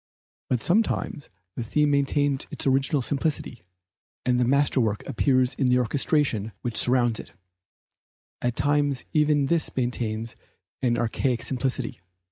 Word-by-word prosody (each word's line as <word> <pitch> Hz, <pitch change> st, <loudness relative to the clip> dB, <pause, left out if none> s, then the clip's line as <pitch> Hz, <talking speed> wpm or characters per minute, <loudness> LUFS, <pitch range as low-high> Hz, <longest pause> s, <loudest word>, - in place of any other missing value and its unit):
But 125 Hz, -3 st, +1 dB
sometimes 180 Hz, -, 0 dB, 0.2 s
the 120 Hz, -, -4 dB
theme 150 Hz, +6 st, +1 dB
maintains 140 Hz, 0 st, +1 dB
its -, -, -6 dB
original 135 Hz, +1 st, +2 dB
simplicity, 140 Hz, -3 st, -2 dB, 0.6 s
and 125 Hz, -1 st, +2 dB
the 125 Hz, -, +3 dB
masterwork 130 Hz, -6 st, +1 dB
appears 130 Hz, +1 st, +2 dB
in 135 Hz, -, 0 dB
the 125 Hz, 0 st, +4 dB
orchestration 125 Hz, -3 st, 0 dB
which 120 Hz, -2 st, -3 dB
surrounds 120 Hz, -2 st, +2 dB
it; 85 Hz, -, -10 dB, 1.1 s
at 120 Hz, -1 st, -1 dB
times 145 Hz, -1 st, +1 dB
even 150 Hz, -2 st, +3 dB
this 165 Hz, +3 st, +1 dB
maintains 115 Hz, -3 st, -2 dB, 0.5 s
an 120 Hz, -2 st, +1 dB
archaic 120 Hz, +1 st, 0 dB
simplicity. 130 Hz, -3 st, -2 dB
130 Hz, 125 wpm, -25 LUFS, 120-145 Hz, 1.1 s, the